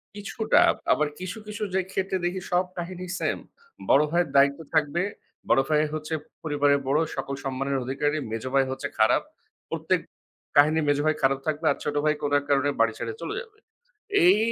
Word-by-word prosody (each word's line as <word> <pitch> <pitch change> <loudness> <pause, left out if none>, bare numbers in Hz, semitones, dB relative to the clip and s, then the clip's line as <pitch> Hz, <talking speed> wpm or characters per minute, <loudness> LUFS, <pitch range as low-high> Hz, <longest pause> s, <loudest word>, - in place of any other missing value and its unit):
কিছুটা। 215 +2 +1 0.3
আবার 150 0 +3
কিছু, 185 +4 -5
কিছু 210 0 -5
যে 190 - +2
ক্ষেত্রে 190 0 -1
দেখি 180 +1 -2
সব 180 +1 +3
কাহিনী 180 +1 -5
সেম। - - 0 0.5
বড় 145 - +6
ভাইয়ের 175 -3 +2
দায়িত্ব 140 +2 +5
থাকবে, 155 +2 +2 0.5
বড় 135 - +5
ভাই 150 0 +4
হচ্ছে 155 +1 -4 0.3
পরিবারের 145 -2 +2
বড়, 145 +3 +3 0.2
সকল 135 0 -4
সম্মানের 135 +1 -1
অধিকারী। 145 +4 -1
মেজ 115 +1 -3
ভাই 135 -1 +4
হচ্ছে 135 +2 -3
খারাপ। 110 - +4 0.5
প্রত্যেক - - 0 0.6
কাহিনী 155 +2 +6
মেজ 145 0 +3
ভাই 155 0 +3
খারাপ 135 0 +3
থাকবে 155 +1 -1
আর - - -2
ছোট 150 - -2
ভাই 155 - +4
কোনো 145 -1 -1
এক 145 - -11
কারণে 140 0 +3
বাড়ি 115 -1 +3
ছেড়ে 115 -1 -3
চলে 165 - -4
যাবে। 440 -2 -15 0.7
এই 185 +4 +7
150 Hz, 180 wpm, -26 LUFS, 140-175 Hz, 0.7 s, এই